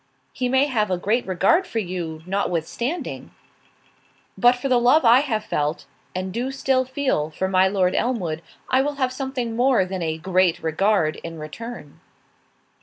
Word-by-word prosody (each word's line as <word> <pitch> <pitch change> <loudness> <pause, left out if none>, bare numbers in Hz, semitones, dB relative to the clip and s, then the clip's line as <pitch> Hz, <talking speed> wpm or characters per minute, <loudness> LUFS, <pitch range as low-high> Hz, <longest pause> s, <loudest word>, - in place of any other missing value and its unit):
"He 250 -1 -1
may 265 +2 +4
have 220 -7 0
a 185 - 0
great 215 +7 0
regard 195 - +2
for 230 - -5
you, 175 -6 -4
notwithstanding." 200 - -3 1.1
"But 245 +1 +5
for 250 +2 -4
the 250 -2 +3
love 250 +4 +4
I 235 +2 +7
have 230 -7 -1
felt, 150 +2 -2 0.3
and 185 0 -3
do 245 +4 -2
still 265 -1 +1
feel, 260 - -1
for 185 +4 -2
my 190 0 +4
Lord 190 -2 +1
Elmwood, 180 -11 -1 0.3
I 260 +1 +3
will 290 +1 -2
have 260 -2 -1
something 255 -3 -3
more 245 -5 +3
than 185 0 -5
a 160 -1 -2
great 180 0 +1
regard 165 0 +1
in 165 0 -8
return." 155 +1 -9
210 Hz, 165 wpm, -23 LUFS, 180-255 Hz, 1.1 s, I